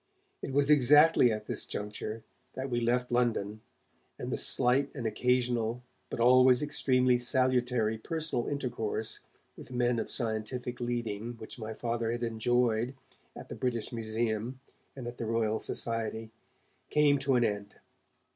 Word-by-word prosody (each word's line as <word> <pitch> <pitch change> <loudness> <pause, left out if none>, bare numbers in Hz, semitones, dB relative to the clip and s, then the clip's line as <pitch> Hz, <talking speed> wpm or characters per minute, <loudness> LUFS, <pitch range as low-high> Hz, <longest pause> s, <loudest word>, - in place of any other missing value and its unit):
It - - -5
was 145 +2 +3
exactly 150 -1 +6
at 105 0 -4
this - - -1
juncture 105 +2 -5 0.3
that 130 0 -5
we 120 0 0
left 125 +1 0
London, 110 -4 0 0.6
and - - -5
the - - 0
slight 135 +3 +4
and 125 -5 -5
occasional 120 +1 0 0.3
but - - -5
always 125 +2 +5
extremely 130 -4 +2
salutary 125 -3 +1
personal 160 -2 -3
intercourse 115 -6 -3 0.4
with - - -12
men 120 -1 +1
of - - -4
scientific 120 +1 -2
leading 120 -2 -3
which 115 +1 -10
my 110 0 -6
Father 115 -1 -2
had 120 +1 -3
enjoyed 120 +1 0 0.4
at - - -10
the - - -6
British 120 -2 -2
Museum 115 +2 -2 0.4
and 130 -3 -7
at 120 0 -7
the 115 - -4
Royal 110 -1 0
Society 115 -1 -3 0.6
came 145 -2 +3
to 135 -1 +1
an 120 - +3
end. 100 -2 -3
120 Hz, 145 wpm, -30 LUFS, 110-125 Hz, 0.6 s, exactly